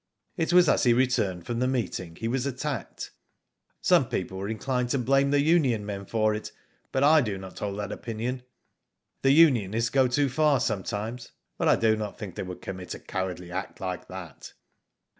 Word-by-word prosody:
It 165 -2 0
was 180 -1 +6
as - - +3
he 120 - +6
returned 115 -8 +1
from 120 -1 -3
the 125 - +1
meeting 110 -9 -2
he 115 - -4
was 130 +3 -1
attacked. 135 -2 -4 0.7
Some - - +4
people 95 - -3
were 100 +2 -4
inclined 125 +2 -1
to 140 - +1
blame 135 +2 +2
the 145 0 +3
union 140 -9 +2
men 100 -2 -5
for 110 -1 +1
it, 105 - -5 0.4
but 135 - +1
I 155 +2 +6
do 105 -6 -2
not 95 -1 -9
hold 100 -1 -3
that 105 0 -4
opinion. 120 +3 -4 0.8
The 135 - +3
unionists 120 - +4
go 135 -2 +4
too 140 +3 +2
far 145 +1 +2
sometimes, 110 +3 -3 0.2
but - - -1
I - - +6
do 110 -1 +3
not 105 -2 -5
think 100 -4 -7
they - - -5
would 90 -1 -7
commit 95 -1 -6
a - - -10
cowardly 90 -2 -4
act - - -5
like 90 -1 -4
that." 90 -4 -9
115 Hz, 190 wpm, -27 LUFS, 100-135 Hz, 0.8 s, was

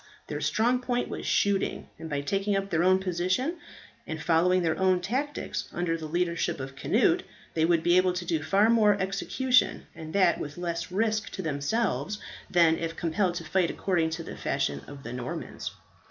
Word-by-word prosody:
Their - - -5
strong 240 +3 +2
point 245 -1 -1
was - - -5
shooting; 200 -1 +1
and 160 - -7
by 145 -2 -1
taking 195 +7 0
up 195 0 -2
their 165 - +2
own 185 +1 +5
position, 185 - -1 0.5
and 160 0 -4
following 180 +3 +3
their 160 -2 +1
own 185 -1 +3
tactics, 265 +11 -3
under 175 -1 -1
the 160 -1 -5
leadership 170 0 -1
of 135 0 -6
Cnut, - - +2 0.3
they 160 -1 +2
would 170 -1 +2
be 175 +1 +4
able 185 0 +4
to 180 0 -4
do 165 -3 0
far 200 +8 +3
more 210 -3 +4
execution, 225 +7 +1
and 160 -1 -8
that 185 -3 +4
with 145 +2 -6
less 170 0 -3
risk 215 +2 0
to 190 - -4
themselves, 155 - -1 0.3
than 170 -2 +4
if 165 0 -3
compelled 175 +2 0
to 170 - -4
fight 180 +2 +1
according 170 -4 0
to 165 +1 -4
the - - -8
fashion 140 0 -1
of 140 -1 -10
the 120 - -6
Normans. 125 0 -5
180 Hz, 185 wpm, -28 LUFS, 160-195 Hz, 0.5 s, own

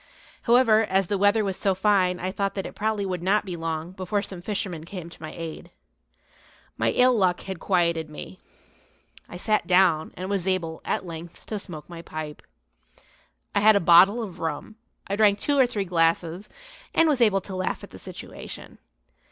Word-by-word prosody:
However, 230 -3 +5
as 195 -1 +1
the 200 +3 -1
weather 205 +2 +4
was 195 -2 -2
so 195 -2 +1
fine 190 -2 +2
I 185 +1 -2
thought 200 0 -2
that 195 - -3
it - - -7
probably 215 -1 -1
would 180 -2 -3
not 200 +4 +2
be 180 -3 -5
long 165 0 -4
before 190 +2 -2
some 185 -4 -8
fisherman 185 -5 -4
came 170 -1 -8
to - - -15
my 155 - -6
aid. 165 -1 -7 1.1
My 110 0 +1
ill 250 - +4
luck 185 -4 +2
had 190 -3 -6
quieted 170 -4 +1
me. 120 -11 -9 0.9
I 175 - -7
sat 215 +3 0
down 180 -4 +3
and 185 +2 -4
was 195 -2 -2
able, 170 -4 -1
at - - -1
length, 165 0 -9
to 215 - -4
smoke 165 -6 -7
my 170 -1 -9
pipe. 155 -2 -7 1.1
I - - +3
had 215 +1 +6
a - - +5
bottle 185 +7 +6
of 185 -5 -8
rum; 160 +5 -4 0.3
I 200 - -2
drank 205 -1 +4
two 285 +4 +1
or 260 - +6
three 205 -5 -3
glasses, 170 +2 0 0.5
and 330 - +5
was 285 -5 +2
able 200 -4 +4
to 190 0 -8
laugh 185 0 -2
at - - -11
the - - -11
situation. - - -9
185 Hz, 190 wpm, -25 LUFS, 170-205 Hz, 1.1 s, had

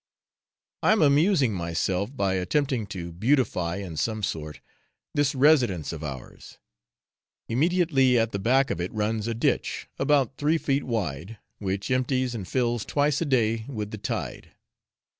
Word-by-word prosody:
I - - +4
am 215 - +3
amusing 145 - +4
myself 90 - -2
by 95 -3 +1
attempting 120 +4 0
to 85 -3 -6
beautify, 95 - +1
in 90 -5 -6
some 110 +2 -1
sort, 75 -4 -4 0.5
this 145 -1 +1
residence 130 - +3
of 80 -1 -7
ours. 70 -4 -8 0.9
Immediately 140 -2 +3
at 115 0 +1
the 100 - -3
back 130 +5 +2
of 85 - -2
it 90 - -3
runs 110 +1 -1
a 115 - -2
ditch, 115 - -1
about 135 -3 +2
three 150 +3 +2
feet 140 -2 -1
wide, 100 - -3 0.2
which 100 +2 -3
empties 130 0 +1
and 100 -6 -5
fills 120 -2 0
twice 145 +1 +1
a - - +1
day 115 -5 +1
with 105 -6 -5
the 110 - -6
tide. - - -5
115 Hz, 150 wpm, -26 LUFS, 95-140 Hz, 0.9 s, I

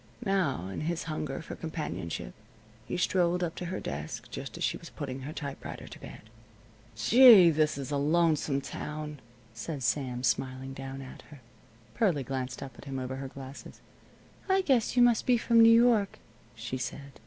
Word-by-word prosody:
Now, 175 - 0
in 95 - -5
his 165 +2 -2
hunger 155 -2 -4
for - - -7
companionship, 150 - -5 0.5
he, - - -3
strolled 180 -1 +1
up 170 -2 -2
to 180 - -6
her 185 +2 -3
desk, 70 +3 -6
just - - -6
as - - -4
she - - +1
was - - -10
putting 135 -2 -6
her 135 +3 -6
typewriter 140 -3 -7
to - - -11
bed. - - -10 0.7
"Gee 210 - +8
I - - +3
This 155 -2 +1
is 140 0 -5
a 145 - +1
lonesome 150 -2 +2
town!" 150 +1 -6 0.3
said 130 +5 -5
Sam, 125 +2 -1
smiling 130 +2 -1
down 135 0 -7
at 130 - -11
her. 145 -2 -13 0.5
Pearlie 180 - +1
glanced 130 0 -4
up 130 -3 -10
at - - -12
him, 135 -1 -5
over 130 0 -4
her 135 0 -5
glasses. 135 +1 -10 0.7
"I 380 0 +4
guess 255 - +1
you 245 - +7
must 240 -2 +3
be 250 -1 +5
from 230 0 +4
New 225 - +8
York," 225 -5 +3 0.4
she 125 +3 -5
said. 140 +2 -6
145 Hz, 180 wpm, -29 LUFS, 130-175 Hz, 0.7 s, Gee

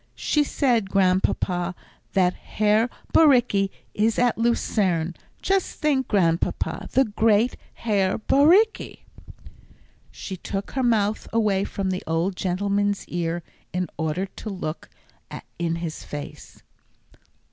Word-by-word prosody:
"She 300 - +2
said, 240 -8 +1
Grandpapa, 185 -1 +1 0.4
that 180 -2 +3
Herr 215 +3 +1 0.2
Bauricke 245 -10 +4 0.2
is 220 +2 +1
at 245 -1 +3
Lucerne; 190 -7 0 0.3
just 390 -1 0
think, 285 -4 +1
Grandpapa, 170 -5 0
the 265 - +4
great 220 +2 +2 0.2
Herr 200 -4 0
Bauricke!" 335 - +3 1.1
She 190 - -7
took 195 +2 -5
her 265 - -1
mouth 220 -3 +1
away 210 -4 +2
from 195 -1 -3
the 185 - -3
old 165 +4 0
gentleman's 200 +2 -1
ear 170 0 -2 0.3
in 180 0 -2
order 160 +4 -1
to 205 +3 -9
look 175 -6 -5 0.7
in 170 -1 0
his 165 -2 -5
face. 150 +1 -9
200 Hz, 115 wpm, -24 LUFS, 180-230 Hz, 1.1 s, Bauricke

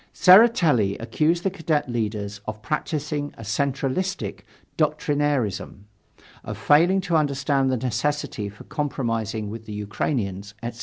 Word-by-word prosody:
Tseretelli 175 - +6
accused 155 +9 0
the 195 - +1
Cadet 160 -6 -1
leaders 105 -3 -3
of 110 0 -6
practising 150 -1 -2
a 115 - -9
centralistic 140 - -2 0.3
doctrinairism, 145 - 0 0.6
of - - -6
failing 175 +6 +4
to 180 -2 -1
understand 140 -2 +1
the 130 - +1
necessity 125 -3 -2
for 100 - -13
compromising 115 -7 -2
with 110 0 -8
the 105 - -6
Ukrainians, 105 -1 -3
etc. 120 0 -5
135 Hz, 120 wpm, -24 LUFS, 110-150 Hz, 0.6 s, Tseretelli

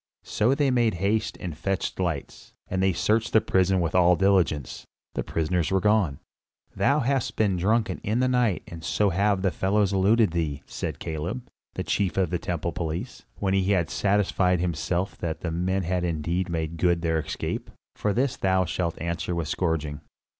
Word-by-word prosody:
So 120 +6 +1
they 140 -2 +2
made 120 -5 +2
haste 100 +5 0
and 85 -4 -5
fetched 95 +4 -2
lights, 85 -6 -4
and 95 0 -1
they 95 0 +3
searched 110 +6 +1
the 110 - +7
prison 95 -2 +2
with 85 -2 -1
all 90 0 +5
diligence. 90 -7 +1 0.3
The - - -2
prisoners 85 +1 0
were 95 - +2
gone. 100 -8 +2 0.6
"Thou 140 +2 +2
hast 135 0 0
been 100 -4 +2
drunken 105 +5 +1
in 110 +4 -1
the 130 - +3
night 125 -6 +1
and 85 -1 -9
so 90 +6 +1
have 100 +1 +1
the 95 - +2
fellows 100 +3 +1
eluded 105 +1 +4
thee," 80 -4 -2
said - - -5
Caleb, 85 +10 -4 0.3
the - - -2
chief 100 -2 0
of 90 -4 +1
the 90 - 0
temple 85 0 -2
police, 85 +8 -5
when 95 -1 -1
he 95 +1 +2
had 85 -4 0
satisfied 95 -3 +2
himself 85 +2 -2
that 80 -2 -3
the 85 - -2
men 95 +3 0
had 90 +1 -1
indeed 85 +2 -1
made 80 -1 -3
good 85 -1 +2
their 80 -1 +1
escape. 80 - -4 0.3
"For 105 - 0
this 125 +5 0 0.3
shalt 85 -1 -2
thou - - -6
answer 85 +1 -2
with 85 -1 -1
a 75 - -4
scourging." 80 -4 -1
90 Hz, 185 wpm, -26 LUFS, 85-100 Hz, 0.6 s, the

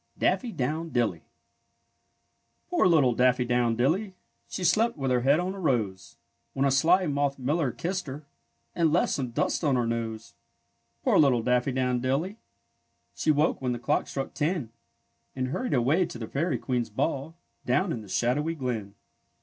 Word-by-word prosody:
DAFFY 250 - +1
DOWN 155 +6 -2
DILLY 110 - 0 1.5
Poor - - +4
little 145 -8 +4
Daffy 125 +1 +3
do 120 - -1
wn 120 -2 +2
dilly! 185 - 0 0.3
She 185 - -5
slept 215 +6 +2
with 135 -2 -1
her 125 -1 +2
head 140 +5 +4
on 185 +2 -2
a 195 - -8
rose, 110 - -1 0.4
When 135 - +1
a 140 - +3
sly 175 +7 +4
moth 140 -2 0
miller 140 +2 0
kissed 180 +4 -3
her, 140 +3 -7 0.5
And 165 -3 +2
left 170 - +2
some 130 -3 -2
dust 120 - -1
on 140 -4 +2
her 120 -1 +1
nose. 115 0 -4 0.7
Poor - - +4
little 130 -6 +4
Daffy 125 +2 +1
do 130 +1 -1
wn 125 -1 0
dilly! 155 - -1 0.7
She - - -2
woke 150 0 +2
when 125 -1 0
the - - -3
clock 135 +5 0
struck 135 -1 -4
ten, 150 -6 -1 0.6
And 130 -1 -2
hurried 245 - -1
away 145 +9 +2
to 125 - -8
the 115 -2 -6
fairy 165 +9 -1
queen's 125 -3 -2
ball, 140 +7 -2 0.3
Down 190 -2 +1
in 115 - -3
the 105 - -13
shadowy 125 - 0
glen. 115 -8 -4
135 Hz, 175 wpm, -27 LUFS, 120-165 Hz, 1.5 s, Poor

